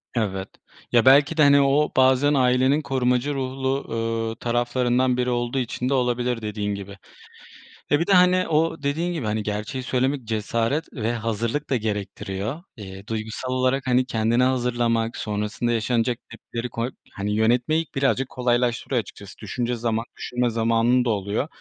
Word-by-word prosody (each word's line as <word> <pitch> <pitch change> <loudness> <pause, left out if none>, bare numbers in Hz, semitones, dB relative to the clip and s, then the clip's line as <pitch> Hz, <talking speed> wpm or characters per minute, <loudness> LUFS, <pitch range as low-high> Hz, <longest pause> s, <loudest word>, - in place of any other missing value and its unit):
Evet, 95 -4 -2 0.4
ya, 120 0 +4
belki 140 +4 +6
de, 150 - +6
hani, 140 0 +6
o 140 +2 +2
bazen 130 +2 +4
ailenin 130 +2 +3
korumacı 130 0 0
ruhlu, 135 0 -2
ııı, 115 0 -2
taraflarından 125 +1 +1
biri 125 0 0
olduğu 120 +1 -1
için 125 +1 -2
de 140 - +1
olabilir 125 -2 0
dediğin 105 -1 -3
gibi 100 0 -9 0.9
ve 145 - +4
bir 170 - -1
de, 200 - +3
hani, 180 0 +5
o 160 -1 0
dediğin 160 +5 -1
gibi 110 -9 -2
gerçeği 105 +5 -4
söylemek 130 +1 0
cesaret 115 +7 -1
ve 115 -2 -2
hazırlık 115 +5 -2
da 135 - +2
gerektiriyor. 105 - -4
Eee, 95 -1 -10
duygusal 110 +3 -4
olarak, 130 +1 +1
hani, 125 0 +3
kendini 115 +1 +1
hazırlamak 120 -2 0
sonrasında 105 +3 -2
yaşanacak 115 +1 0
tepkileri 115 +1 -6
koyup, 115 +2 -4 0.2
hani, 105 +1 -3
yönetmeyi 125 +9 +2
birazcık 135 -1 +1
kolaylaştırıyor 120 0 0
açıkçası 100 -2 -13
düşünce 120 +3 -2
zaman 115 0 -1
düşünme 125 0 -1
zamanın 115 +2 +2
da - - +1
oluyor. 105 +5 -1
120 Hz, 150 wpm, -23 LUFS, 115-130 Hz, 0.9 s, belki